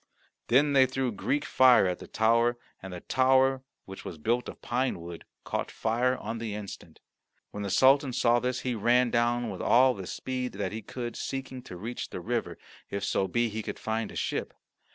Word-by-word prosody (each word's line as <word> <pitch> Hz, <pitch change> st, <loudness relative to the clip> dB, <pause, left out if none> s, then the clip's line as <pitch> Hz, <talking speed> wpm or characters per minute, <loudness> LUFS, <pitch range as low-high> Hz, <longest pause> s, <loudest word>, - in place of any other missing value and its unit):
Then 140 Hz, +4 st, +4 dB
they 130 Hz, -1 st, +6 dB
threw 130 Hz, -1 st, -1 dB
Greek 140 Hz, +7 st, -1 dB
fire 130 Hz, -5 st, +6 dB
at 90 Hz, -1 st, -1 dB
the -, -, -10 dB
tower, 115 Hz, +2 st, +2 dB, 0.2 s
and 95 Hz, -, -8 dB
the 90 Hz, -1 st, -7 dB
tower, 130 Hz, 0 st, +3 dB, 0.2 s
which 95 Hz, 0 st, -9 dB
was 85 Hz, -, -7 dB
built 120 Hz, +10 st, 0 dB
of -, -, -10 dB
pine 125 Hz, -5 st, -1 dB
wood, 85 Hz, 0 st, -9 dB, 0.2 s
caught -, -, -3 dB
fire 125 Hz, +3 st, 0 dB
on 115 Hz, -, -5 dB
the 110 Hz, -2 st, -4 dB
instant. 105 Hz, -2 st, -9 dB, 0.5 s
When 105 Hz, -, -6 dB
the 100 Hz, -, -3 dB
Sultan 135 Hz, +5 st, +4 dB
saw 120 Hz, 0 st, +3 dB
this 125 Hz, 0 st, -2 dB
he 125 Hz, -, -1 dB
ran 120 Hz, +2 st, +3 dB
down 120 Hz, 0 st, +1 dB
with -, -, -6 dB
all 130 Hz, +2 st, +5 dB
the 95 Hz, -5 st, -7 dB
speed 125 Hz, +3 st, -4 dB
that 100 Hz, +2 st, -3 dB
he 110 Hz, +1 st, -5 dB
could, 120 Hz, 0 st, -6 dB
seeking 130 Hz, -1 st, -5 dB
to 90 Hz, -, -8 dB
reach 115 Hz, +7 st, -5 dB
the -, -, -6 dB
river, -, -, -3 dB, 0.3 s
if 100 Hz, 0 st, -4 dB
so 95 Hz, -, 0 dB
be 120 Hz, +2 st, +1 dB
he 110 Hz, +1 st, -4 dB
could -, -, -6 dB
find 110 Hz, 0 st, -3 dB
a -, -, -11 dB
ship. -, -, -3 dB
120 Hz, 200 wpm, -28 LUFS, 105-130 Hz, 0.5 s, they